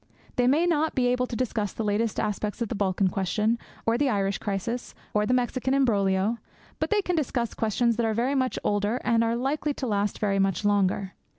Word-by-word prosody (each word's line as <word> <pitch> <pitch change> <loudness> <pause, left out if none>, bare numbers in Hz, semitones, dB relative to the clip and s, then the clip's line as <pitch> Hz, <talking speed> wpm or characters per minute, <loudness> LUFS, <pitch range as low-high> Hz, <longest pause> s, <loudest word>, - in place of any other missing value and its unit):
They 245 0 +2
may 300 +7 +4
not 315 -2 +1
be 255 -3 +2
able 250 0 +1
to 240 - -5
discuss 220 -4 -1
the 225 - -3
latest 210 +1 0
aspects 210 +1 -2
of 235 -3 -2
the - - -2
Balkan 195 -1 +1
question, 210 +5 0 0.3
or 230 +1 +2
the 285 -2 +2
Irish 195 -3 0
crisis, 210 +4 -3 0.2
or 210 0 +2
the 250 - +2
Mexican 255 +1 0
embroglio; 205 -4 +2 0.4
but - - -1
they 420 -1 +2
can 360 - 0
discuss 250 -6 -1
questions 230 +1 +1
that 235 - +1
are 220 - 0
very 245 +5 +1
much 260 -2 0
older 205 +4 0
and 230 -2 +3
that 230 - +2
are 230 - +1
likely 280 +4 -1
to 265 - -4
last 205 -3 0
very 200 -2 0
much 195 0 +1
longer. 195 -1 +1
230 Hz, 215 wpm, -26 LUFS, 205-250 Hz, 0.4 s, may